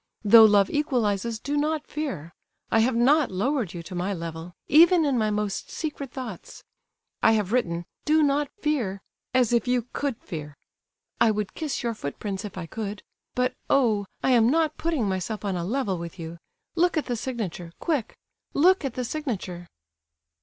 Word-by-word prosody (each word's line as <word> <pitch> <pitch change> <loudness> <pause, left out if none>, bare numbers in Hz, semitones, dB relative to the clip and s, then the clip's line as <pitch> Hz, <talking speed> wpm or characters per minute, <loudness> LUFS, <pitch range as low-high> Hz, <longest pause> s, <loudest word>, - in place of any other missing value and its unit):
Though 220 +2 +9
love 205 -2 +4
equalizes, 235 -7 0
do 285 +5 -3
not 300 +1 0
fear. 260 - -5 0.4
I 225 - +4
have 235 +2 +2
not 275 +5 +4
lowered 205 - -1
you 170 - -6
to 185 - -9
my 180 +3 -1
level, 165 +1 -7
even 335 +2 +6
in 280 -3 +1
my 215 -3 +2
most 210 -1 -2
secret 290 -5 -5
thoughts. 240 -9 -8 0.6
I 225 - +5
have 210 -3 0
written 175 -9 0 0.2
'Do 310 0 +4
not 285 0 +2
fear,' 230 -11 -1 0.3
as 245 -2 +3
if 235 +1 +2
you 245 -1 +2
could 280 -5 -2
fear. 150 -5 -8 0.6
I 230 - +5
would 210 -2 -1
kiss 305 -4 -3
your 235 -1 0
footprints 195 +3 -5
if 205 -3 -7
I 180 - -4
could; 205 +2 -5 0.3
but, 250 0 +1 0.2
oh! 220 -7 +3 0.2
I 265 - +3
am 235 -2 +5
not 315 +1 +2
putting 320 -10 -1
myself 195 +3 -3
on 195 -2 -1
a 175 - -2
level 200 -2 -1
with 170 +1 -7
you!—Look 170 - -3
at 305 - 0
the 245 - -2
signature—quick, 220 - -3 0.4
look 365 +5 +5
at 270 -4 -3
the 255 - -2
signature!" 205 - -4
225 Hz, 170 wpm, -26 LUFS, 190-280 Hz, 0.6 s, Though